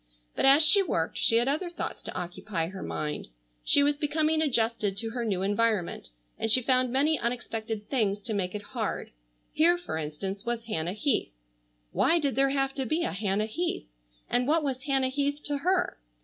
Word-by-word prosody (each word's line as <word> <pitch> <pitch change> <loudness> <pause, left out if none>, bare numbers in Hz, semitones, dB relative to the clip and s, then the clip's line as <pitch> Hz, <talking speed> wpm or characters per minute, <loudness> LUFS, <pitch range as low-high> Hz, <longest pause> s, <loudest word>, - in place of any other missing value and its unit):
But - - +1
as 275 +3 +7
she 400 +5 +8
worked 165 - -2
she 225 - +3
had 235 +2 +3
other 310 +6 -1
thoughts 345 - -5
to - - -7
occupy 175 0 -3
her 190 0 -8
mind. 150 -1 -4 0.4
She 285 - +5
was 290 0 +2
becoming 310 +1 +1
adjusted 225 -8 0
to 225 +2 -2
her 240 0 -3
new 195 -5 -1
environment 205 - 0 0.3
and 225 - -1
she 240 - +6
found 255 0 +2
many 290 +4 +2
unexpected 225 -3 -4
things 210 -7 0
to 220 +2 -4
make 190 -1 -2
it 205 - -5
hard. - - -3 0.4
Here, 345 +3 +5
for 350 - -5
instance, 190 +6 -5
was 235 -1 -3
Hannah 175 -6 -3
Heath. 235 - 0 0.6
Why 335 - +3
did 285 -4 0
there 275 +1 +3
have 270 0 0
to 270 -1 -3
be 320 +7 0
a - - -1
Hannah 200 +1 -1
Heath? 335 +11 -3 0.4
And 245 +1 0
what 315 +1 +2
was 265 -2 -3
Hannah 270 -2 +1
Heath 285 +2 -1
to 290 -1 -1
her? 365 - 0
245 Hz, 190 wpm, -27 LUFS, 205-285 Hz, 0.6 s, she